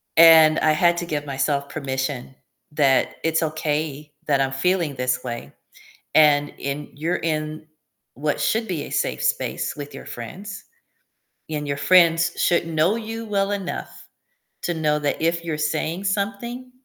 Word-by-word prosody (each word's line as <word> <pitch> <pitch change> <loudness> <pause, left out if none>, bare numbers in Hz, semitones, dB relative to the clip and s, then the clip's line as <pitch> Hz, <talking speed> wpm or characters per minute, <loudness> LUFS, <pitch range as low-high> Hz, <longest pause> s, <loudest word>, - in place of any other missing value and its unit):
And 160 -1 +8
I 155 - +3
had 170 +2 +3
to 175 - -2
give 150 -3 -3
myself 140 +1 -1
permission 135 -2 -4 0.4
that 140 -3 +2
it's 165 0 +1
okay 150 -1 -2 0.2
that 140 -2 +3
I'm 135 -1 +1
feeling 165 +2 0
this 125 0 -1
way. 120 -2 -6 0.6
And 145 -2 +5
in 140 +1 -4
you're 160 +5 -1
in 155 -1 -3 0.5
what 145 +4 -2
should 225 +1 +1
be 170 -7 -3
a - - -9
safe - - -1
space - - -1
with 145 -1 -8
your - - -9
friends, 195 - -8 0.9
and 150 -1 -3
your 140 - -1
friends 170 +2 +4
should 170 -1 +2
know 165 +5 +2
you 225 0 -5
well 200 -1 0
enough 195 -3 -5 0.5
to 175 - -1
know 150 -2 +1
that 145 -1 -1
if 170 +1 0
you're 160 -2 -2
saying 155 +4 -2
something, 205 +6 -3
155 Hz, 155 wpm, -23 LUFS, 145-175 Hz, 0.9 s, And